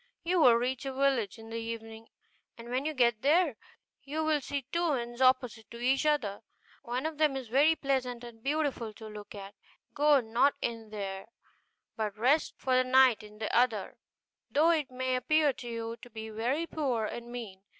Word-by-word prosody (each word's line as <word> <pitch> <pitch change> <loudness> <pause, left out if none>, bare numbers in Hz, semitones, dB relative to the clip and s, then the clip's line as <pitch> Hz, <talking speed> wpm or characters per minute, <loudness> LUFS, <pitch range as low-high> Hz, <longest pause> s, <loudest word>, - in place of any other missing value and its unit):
You 355 0 +2
will 245 -5 +7
reach 250 +2 -1
a 265 - -3
village 260 -6 +1
in 225 0 -12
the 230 - -3
evening; 225 0 -7 0.5
and 235 0 -10
when 255 +3 -1
you 310 - -2
get 235 -4 +2
there, 310 -1 +3 0.5
you 305 +3 -3
will 310 -2 +1
see 280 -1 -4
two 340 -3 +1
inns 240 0 -5
opposite 250 -4 +2
to 235 - -9
each 265 +5 +1
other, 230 -10 0 0.4
one 255 +2 -3
of 315 -1 -4
which 300 -3 +3
is 255 -4 -7
very 290 +6 +4
pleasant 255 -4 -2
and 235 -2 -11
beautiful 275 -5 -1
to 220 - -11
look 210 -1 -9
at: 200 0 -9 0.4
go 295 -1 +5
not 240 +4 +2
in 225 -2 -4
there, 195 -2 -5 0.7
but 215 -1 -3
rest 265 +8 +2
for 260 -1 0
the 255 - +4
night 255 -2 +5
in 210 0 -13
the 215 0 -3
other, 235 -5 +1 0.5
though 315 +4 +4
it 310 -5 0
may 255 0 -1
appear 300 +2 +3
to 240 - -8
you 230 0 -4
to 245 - -13
be 220 -1 -7
very 245 +9 -1
poor 265 -9 -1
and 235 +2 -6
mean. 220 -6 -7
245 Hz, 190 wpm, -30 LUFS, 225-280 Hz, 0.7 s, will